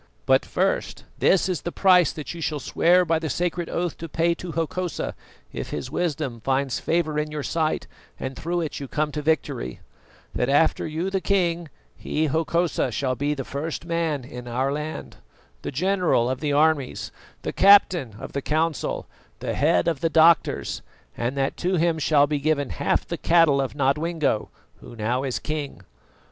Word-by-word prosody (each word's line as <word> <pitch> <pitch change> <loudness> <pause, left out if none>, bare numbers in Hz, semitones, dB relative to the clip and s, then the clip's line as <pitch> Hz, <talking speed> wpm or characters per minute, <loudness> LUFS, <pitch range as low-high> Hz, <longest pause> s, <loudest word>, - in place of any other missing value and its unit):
But - - +4
first, - - -1 0.2
this 190 - +4
is 180 -6 -2
the 175 - -4
price 180 -4 +5
that 150 +1 -6
you 170 - -8
shall 150 -2 -1
swear 180 +6 +3
by 165 -1 +1
the 160 -1 -3
sacred 175 0 -1
oath 175 -2 -2
to 165 - -6
pay 170 +2 +2
to 170 0 -7
Hokosa, 170 +2 -2 0.4
if - - -5
his 130 - -5
wisdom 150 -8 -2
finds 135 0 0
favour 155 -2 0
in 150 0 -2
your 150 -1 -4
sight 160 0 -1 0.3
and 130 0 -4
through 170 +5 -2
it 160 - -4
you 140 - -6
come 150 +3 -1
to 150 - -3
victory: 145 - -1 0.5
That 125 - 0
after 145 +4 +3
you, 165 +5 -2
the 195 -1 0
king, 175 -3 0 0.3
he, 155 - -1
Hokosa, 160 0 0
shall 130 +3 -1
be 145 +4 -1
the 135 -2 -5
first 155 +3 -4
man 165 -5 -1
in 125 -1 -9
our 130 +3 0
land, 150 +2 -5 0.4
the - - -4
general 175 -5 +1
of 130 - -3
the 150 -2 -1
armies, 150 -2 +1 0.3
the - - -3
captain 180 - +5
of - - -8
the 140 - -2
council, 155 +2 -1 0.3
the - - -3
head 155 +4 +2
of 165 -5 +1
the 165 - +1
doctors, 160 +1 +3 0.3
and 120 +4 -2
that 135 0 0
to 185 +1 0
him 165 -1 +1
shall 145 -1 +4
be 145 0 -1
given 145 -2 0
half - - 0
the 170 - -3
cattle 165 -5 +4
of 135 0 -3
Nodwengo, 145 -3 0 0.3
who 120 - -12
now 115 +4 -1
is 130 -3 -1
king. 150 -2 -4
155 Hz, 180 wpm, -24 LUFS, 140-170 Hz, 0.5 s, price